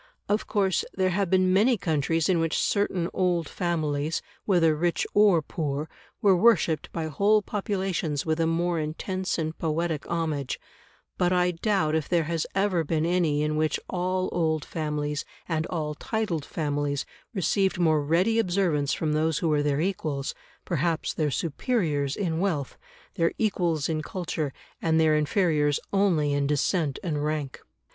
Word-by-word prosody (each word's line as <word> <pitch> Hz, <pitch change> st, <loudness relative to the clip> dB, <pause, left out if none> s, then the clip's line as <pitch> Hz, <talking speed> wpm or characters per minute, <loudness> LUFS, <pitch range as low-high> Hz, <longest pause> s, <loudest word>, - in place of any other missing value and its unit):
Of 210 Hz, +1 st, 0 dB
course 195 Hz, -3 st, +1 dB
there 185 Hz, -1 st, +1 dB
have 195 Hz, 0 st, 0 dB
been 185 Hz, 0 st, +3 dB
many 225 Hz, +5 st, +4 dB
countries 165 Hz, -1 st, 0 dB
in 185 Hz, -3 st, +2 dB
which 165 Hz, -1 st, 0 dB
certain 190 Hz, -4 st, +1 dB
old 175 Hz, -4 st, +1 dB
families, 155 Hz, -3 st, -1 dB, 0.2 s
whether 165 Hz, -5 st, +3 dB
rich 170 Hz, +2 st, 0 dB
or 200 Hz, -6 st, +5 dB
poor, 145 Hz, -1 st, -3 dB, 0.4 s
were 195 Hz, -2 st, +6 dB
worshipped 180 Hz, -6 st, +3 dB
by 165 Hz, -1 st, -3 dB
whole 200 Hz, +8 st, +2 dB
populations 190 Hz, -8 st, -2 dB
with 160 Hz, 0 st, 0 dB
a 165 Hz, -, +2 dB
more 170 Hz, +1 st, 0 dB
intense 185 Hz, +5 st, -2 dB
and 160 Hz, -1 st, -2 dB
poetic 160 Hz, -1 st, -2 dB
homage; 155 Hz, -5 st, -2 dB, 0.6 s
but 180 Hz, 0 st, +3 dB
I 180 Hz, 0 st, +3 dB
doubt 180 Hz, -3 st, 0 dB
if 155 Hz, -2 st, -1 dB
there 170 Hz, -2 st, +2 dB
has 165 Hz, 0 st, -2 dB
ever 195 Hz, -4 st, +2 dB
been 160 Hz, +1 st, 0 dB
any 165 Hz, -4 st, +1 dB
in 150 Hz, 0 st, 0 dB
which 155 Hz, -1 st, +1 dB
all 185 Hz, 0 st, 0 dB
old 160 Hz, -3 st, 0 dB
families 150 Hz, -2 st, -2 dB, 0.2 s
and 160 Hz, -1 st, -1 dB
all 155 Hz, -4 st, -2 dB
titled 175 Hz, -4 st, -2 dB
families 145 Hz, -2 st, -2 dB, 0.3 s
received 190 Hz, +1 st, +1 dB
more 160 Hz, -4 st, +3 dB
ready 180 Hz, +10 st, +2 dB
observance 175 Hz, -8 st, +1 dB
from 155 Hz, -2 st, -1 dB
those 155 Hz, 0 st, +1 dB
who 165 Hz, -, 0 dB
were 150 Hz, -1 st, +2 dB
their 145 Hz, 0 st, +1 dB
equals, 155 Hz, -7 st, -2 dB, 0.3 s
perhaps 165 Hz, 0 st, 0 dB
their 155 Hz, -2 st, 0 dB
superiors, 150 Hz, -, -1 dB
in 165 Hz, -5 st, -1 dB
wealth, 165 Hz, -8 st, -1 dB, 0.4 s
their 165 Hz, 0 st, +1 dB
equals 175 Hz, -8 st, 0 dB
in 155 Hz, -1 st, -1 dB
culture, 160 Hz, -3 st, -3 dB, 0.3 s
and 160 Hz, -1 st, +2 dB
their 155 Hz, -1 st, +4 dB
inferiors 150 Hz, -2 st, +2 dB
only 170 Hz, -8 st, +2 dB
in 140 Hz, 0 st, +1 dB
descent 150 Hz, 0 st, 0 dB
and 150 Hz, -4 st, -1 dB
rank. 150 Hz, -3 st, -3 dB
165 Hz, 155 wpm, -26 LUFS, 150-185 Hz, 0.6 s, were